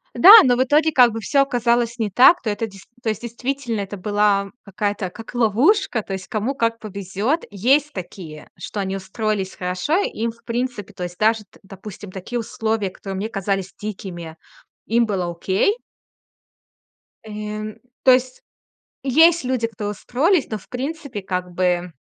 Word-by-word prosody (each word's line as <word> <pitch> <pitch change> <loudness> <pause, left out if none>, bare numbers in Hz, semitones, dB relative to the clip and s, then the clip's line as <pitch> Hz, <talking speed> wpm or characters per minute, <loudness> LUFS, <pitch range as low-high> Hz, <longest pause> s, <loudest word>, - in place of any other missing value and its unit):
Да, 370 - +7
но 250 -2 +4
в 255 - +3
итоге, 300 +4 +3
как 250 -5 +6
бы, 225 - -4
всё 275 +5 +2
оказалось 240 -2 +1
не 215 - 0
так, 255 - +6
то 220 - -2
это 210 +2 -2
дес 195 -2 -14 0.2
то 225 - 0
есть, 215 0 -3
действительно, 240 -1 -3
это 200 +1 -6
была 205 0 +1
какая-то 205 -1 -2
как 225 +7 -11
ловушка. 245 - +2
То 195 - -7
есть, 190 -2 -6
кому 225 +6 -2
как 230 -2 0
повезёт. 205 - -2
Есть 270 +9 +2
такие, 170 -4 -9
что 210 - -6
они 195 -1 -2
устроились 195 0 -3
хорошо. 180 - -1
И - - -1
им, 230 - 0
в 230 - -23
принципе, 235 -4 -3
то 185 - -6
есть, 175 0 -6
даже, 220 +1 +2
т - - -23
допустим, 195 0 -10
такие 200 +6 -5
условия, 220 -2 -2
которые 195 +1 -7
мне 210 +3 -3
казались 195 -2 -2
дикими, 175 -6 -7 0.5
им 235 +1 +2
было 190 -5 -2
окей. 190 - 0 1.5
Э, 215 0 -6 0.3
то 260 - +7
есть 255 0 +1 0.6
есть 320 +4 +5
люди, 250 -2 0
которые 210 -2 -5
устроились, 290 - +1
но, 215 - -2
в - - -20
принципе, 270 -3 -5
как 180 -1 -3
бы 180 -1 0
215 Hz, 170 wpm, -21 LUFS, 195-245 Hz, 1.5 s, Да